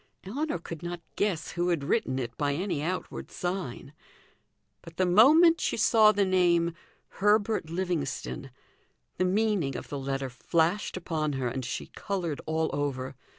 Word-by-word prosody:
Ellinor 275 - -2
could 165 -1 -8
not 175 0 -5 0.2
guess 190 -6 -1
who 175 0 0
had 170 -5 0
written 140 - 0
it 120 -3 -4
by 145 -1 0
any 175 -3 -2
outward 180 +4 -4
sign; 175 -7 -4 0.9
but 165 0 -13
the 185 - +3
moment 305 - +6
she - - 0
saw 220 -1 +6
the 205 -1 +2
name 175 -2 +3 0.5
"Herbert 210 -4 +2
Livingstone," 165 -6 -3 0.7
the 185 - +3
meaning 190 - +1
of - - -8
the 140 - -4
letter 135 -1 -3
flashed 170 +10 0
upon 155 -4 -2
her 130 -2 -1
and 130 +2 -4
she 125 - -4
coloured 175 -7 -4
all 160 0 0
over. 135 -2 -2
170 Hz, 150 wpm, -28 LUFS, 145-195 Hz, 0.9 s, moment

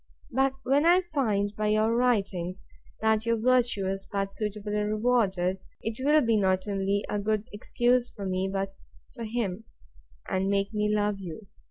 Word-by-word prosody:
But 265 +1 +2
when 275 +3 +3
I 350 +3 +6
can 350 - -23
find, 210 -9 0
by 215 +1 -1
your 215 +2 +2
writings, 195 -7 0 0.4
that 220 0 +2
your 230 0 +2
virtue 240 -3 +2
is 195 +1 -3
but 195 -1 -2
suitably 210 0 -3
rewarded, 210 -4 +1 0.2
it 225 +3 -4
will 300 +2 +5
be 230 -4 +2
not 190 -1 +1
only 200 0 0
a 210 - -1
good 215 +1 -1
excuse 245 +3 +1
for 200 - -8
me, 190 0 -1
but 195 0 -2 0.4
for 235 -3 -6
him, 220 -2 -3 0.6
and 190 +1 0
make 200 +1 0
me 210 0 +1
love 210 -1 +1
you. 190 +3 -8
210 Hz, 170 wpm, -28 LUFS, 195-235 Hz, 0.6 s, I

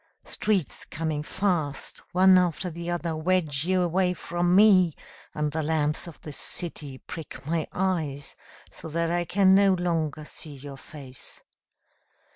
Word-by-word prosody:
Streets 200 -8 -1
coming 155 -1 -2
fast, 165 -4 -1
One 185 +1 +6
after 180 0 +2
the 170 +1 -6
other, 170 -2 -1
Wedge 155 -3 +1
you 185 0 +2
away 180 +1 +1
from 175 +1 0
me, 185 -5 +6 0.4
And 150 -1 0
the 160 +2 -1
lamps 150 +1 0
of 170 - -10
the 150 - -7
city 145 -3 -4
prick 145 -2 -9
my 160 +1 -1
eyes 160 -7 -2 0.4
So - - -10
that 165 +1 0
I 175 0 0
can 190 +1 +4
no 195 -1 +5
longer 160 -4 -1
see 150 -1 -6
your 140 0 -9
face. 135 -2 -7
165 Hz, 145 wpm, -27 LUFS, 150-180 Hz, 0.4 s, One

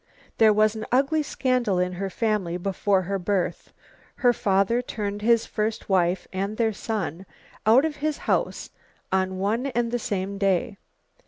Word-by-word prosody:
There 220 -1 +7
was 215 +1 +3
an 220 - -5
ugly 275 +5 +3
scandal 255 -8 0
in 180 0 +1
her 195 +2 -3
family 200 -5 -1
before 195 +1 0
her 195 +2 -2
birth. 190 0 -2 0.4
Her 245 -2 +3
father 200 +3 +2
turned 205 -4 -4
his 230 +1 +3
first 215 0 -3
wife 180 -1 +1
and 200 +3 -2
their 225 -2 +1
son 195 -5 -4 0.4
out 250 +7 +6
of 305 -2 -3
his 300 0 -1
house - - -1 0.4
on 190 0 0
one 220 +7 0
and 240 -3 -1
the 245 - 0
same 200 -3 -3
day. 195 +2 0
210 Hz, 160 wpm, -25 LUFS, 190-235 Hz, 0.4 s, There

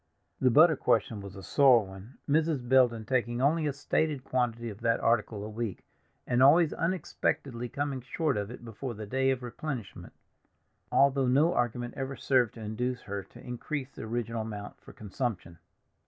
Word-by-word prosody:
The 130 - +4
butter 155 +6 +6
question 110 -5 +1
was 100 0 -9
a 95 - -9
sore 125 +1 +5
one, 95 +6 -12
Mrs. 150 -4 +1
Belden 120 -4 +4
taking 120 -1 0
only 150 +4 +2
a - - +1
stated 145 0 -1
quantity 120 -2 -1
of 100 - -12
that 115 0 +2
article 115 -3 0
a - - -5
week, 110 -2 -5 0.4
and 120 0 +1
always 155 +4 +6
unexpectedly 140 -8 -2
coming 140 -1 -3
short 150 +5 -1
of 100 0 -3
it 120 0 -10
before 115 +2 -6
the 105 0 -7
day 130 +5 +1
of 130 -1 -1
replenishment, 125 -3 -6 0.8
although 135 -1 +3
no 145 +7 +4
argument 120 -1 -1
ever 135 0 -4
served 125 -5 +1
to 115 - -9
induce 125 +4 -3
her 100 -1 -4
to 95 - -16
increase 130 +3 -4
the - - -10
original 115 0 -3
amount 105 -2 -7
for - - -13
consumption. 100 -5 -5
125 Hz, 170 wpm, -29 LUFS, 110-135 Hz, 0.8 s, butter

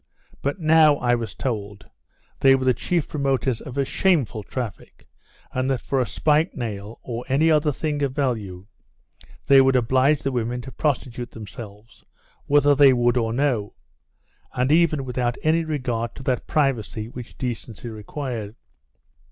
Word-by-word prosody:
But 140 +7 -2
now, 155 -2 +5
I 125 -3 +1
was 115 -4 -2
told, 105 -6 -4 0.5
they 135 0 +6
were 130 -1 -2
the 130 - +4
chief 170 +7 -1
promoters 135 -4 -1
of 135 -3 -8
a 140 - +2
shameful 145 - +1
traffic, 115 0 -7 0.5
and 130 +1 -1
that 135 -2 0
for 135 - -1
a 125 - -1
spike 155 +2 +1
nail, 110 -3 -5
or 120 -1 -5
any 155 +5 +3
other 150 -1 +3
thing 150 +1 -2
they 140 - +2
value, 110 -9 -3 0.8
they 135 -1 +7
would 135 0 +3
oblige 130 +4 +3
the 135 - 0
women 120 0 -2
to 130 +2 -9
prostitute 125 -3 -2
themselves, 110 0 -11 0.4
whether 145 0 +5
they 140 -1 +6
would 120 0 +2
or 115 -2 0
no; 120 -5 0 0.8
and 125 +3 0
even 155 -4 +3
without 125 -1 -1
any 160 +2 +2
regard 125 -7 -3
to 135 - -9
that 130 -2 -1
privacy 120 -7 0
which 120 0 -10
decency 120 -2 -5
required. 110 0 -6
130 Hz, 155 wpm, -23 LUFS, 115-145 Hz, 0.8 s, they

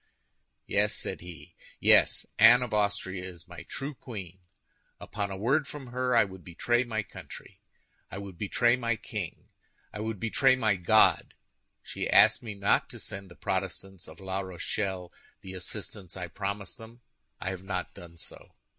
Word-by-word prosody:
"Yes," - - +2
said - - -3
he, 85 -1 -11 0.3
"yes, - - +5
Anne 120 +3 +9
of 120 - -5
Austria 100 -3 0
is 90 -3 -9
my - - -9
true 140 +2 -5
queen. 95 -9 -8 0.6
Upon 105 -2 -3
a 95 - -5
word 135 +8 +2
from 135 -5 -8
her, 125 -1 +1
I 115 - +7
would 95 -3 -9
betray 120 +8 +1
my 110 -3 -2
country, - - -11 0.5
I - - -7
would 100 -2 -7
betray 120 +5 +3
my 115 -2 0
king, - - -6 0.4
I - - -6
would 110 -1 -3
betray 130 +5 +4
my 110 -5 +2
God. 95 +4 +4 0.5
She - - -4
asked - - +6
me 110 -3 -6
not 100 0 +2
to - - -9
send 95 0 -6
the 85 - -13
Protestants 95 0 -3
of 80 - -12
La 95 0 -3
Rochelle 95 0 -3 0.3
the 95 - -8
assistance 95 0 -6
I 90 -2 -5
promised 100 +4 -4
them; 115 +2 -12 0.4
I 95 - -2
have 95 -1 -6
not 95 -2 -3
done 85 -1 -12
so. - - -10
100 Hz, 165 wpm, -29 LUFS, 95-115 Hz, 0.6 s, Anne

